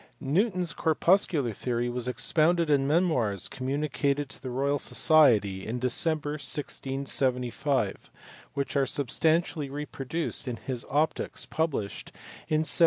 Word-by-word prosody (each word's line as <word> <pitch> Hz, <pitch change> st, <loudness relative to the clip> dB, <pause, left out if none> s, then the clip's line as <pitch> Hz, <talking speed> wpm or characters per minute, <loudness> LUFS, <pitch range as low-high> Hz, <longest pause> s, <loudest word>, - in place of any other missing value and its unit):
Newton 180 Hz, -, +1 dB
s 170 Hz, -, 0 dB
corpuscular 160 Hz, -, +2 dB
theory 120 Hz, +3 st, -2 dB
was 120 Hz, 0 st, -3 dB
expounded 160 Hz, +5 st, +2 dB
in 135 Hz, -1 st, +3 dB
memoirs 130 Hz, -, +1 dB
communicated 140 Hz, +1 st, -1 dB
to -, -, -6 dB
the 130 Hz, -, -5 dB
Royal 140 Hz, +3 st, 0 dB
Society 110 Hz, -, +4 dB
in 115 Hz, +4 st, -3 dB
December, 145 Hz, +4 st, +1 dB
1675, 130 Hz, -3 st, -1 dB, 0.5 s
which 140 Hz, 0 st, -2 dB
are 135 Hz, -1 st, +2 dB
substantially 155 Hz, +3 st, 0 dB
reproduced 145 Hz, +1 st, -3 dB
in 125 Hz, -, -2 dB
his 125 Hz, 0 st, -5 dB
Optics, 150 Hz, +3 st, -1 dB
published 150 Hz, -11 st, -2 dB, 0.4 s
in 155 Hz, 0 st, +2 dB
1704. 160 Hz, -, 0 dB
140 Hz, 120 wpm, -28 LUFS, 125-155 Hz, 0.5 s, Society